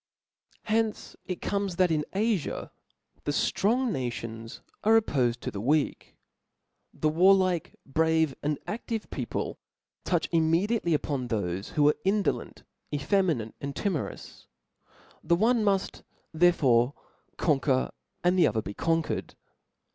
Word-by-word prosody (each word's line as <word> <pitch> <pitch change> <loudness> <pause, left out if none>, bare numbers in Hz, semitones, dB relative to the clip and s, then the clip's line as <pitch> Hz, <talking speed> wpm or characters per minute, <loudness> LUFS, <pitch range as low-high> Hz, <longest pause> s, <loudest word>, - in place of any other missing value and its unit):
From 215 - 0
hence 225 -1 -1
it 185 - -4
comes, 200 -3 -1
that 180 -1 +3
in 150 -2 +1
AGa 205 -4 -1 0.5
the - - -1
drong 235 - +1
nations 115 - -5 0.2
are 225 +1 +6
oppofed 125 - 0
to - - -4
the 100 - -5
weak; 145 +5 0 0.8
the 155 - -1
warlike, 185 +1 +3
brave, 160 0 +2
and 150 0 0
aAive 225 0 -4
people - - -4 0.4
touch 175 -3 0
immediately 170 +3 +2
on 140 -4 -2
thofe 95 -4 -3
'who 145 -1 +4
are 150 - +4
indolent, 200 +1 -1 0.3
effeminate, 150 - 0
and 140 0 -4
timorous; 185 -7 -4 0.8
the 170 - +3
one 225 +4 +3
muft 200 -2 0 0.3
therefore 145 -7 +4 0.4
conquer, 135 -4 +1 0.3
and 180 +1 +3
the - - +6
other 110 -2 -1
be 100 - -6
conquered. 165 +6 -1
165 Hz, 125 wpm, -28 LUFS, 135-195 Hz, 0.8 s, are